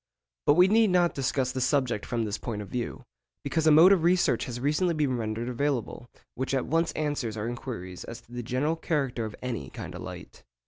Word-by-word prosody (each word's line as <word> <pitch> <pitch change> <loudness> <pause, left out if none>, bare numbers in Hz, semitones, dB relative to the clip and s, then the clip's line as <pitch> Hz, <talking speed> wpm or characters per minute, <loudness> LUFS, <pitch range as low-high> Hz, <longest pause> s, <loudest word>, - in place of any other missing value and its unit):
But 145 - +6
we 180 +2 +7
need 220 +1 +4
not 175 -1 +3
discuss 130 -1 0
the 130 - -3
subject 130 -5 +1
from 115 -2 -1
this 105 0 -3
point 105 -4 -4
of 100 - -12
view, 120 -2 -4 0.4
because 160 +3 0
a - - +7
mode 165 +5 +8
of 195 -4 +5
research 175 +2 +2
has 120 -1 -5
recently 155 +6 +1
been 145 -4 +1
rendered 115 0 -3
available 125 -2 -2 0.2
which 130 +2 -2
at 130 - 0
once 165 +1 +1
answers 145 -8 -2
our 105 +2 -3
inquiries 115 -7 -6
as 115 - -8
to 120 - -24
the 120 0 -4
general 130 +7 0
character 140 -8 -1
of 110 - -6
any 115 - -4
kind - - -8
of - - -7
light. - - -9
130 Hz, 215 wpm, -28 LUFS, 115-155 Hz, 0.4 s, mode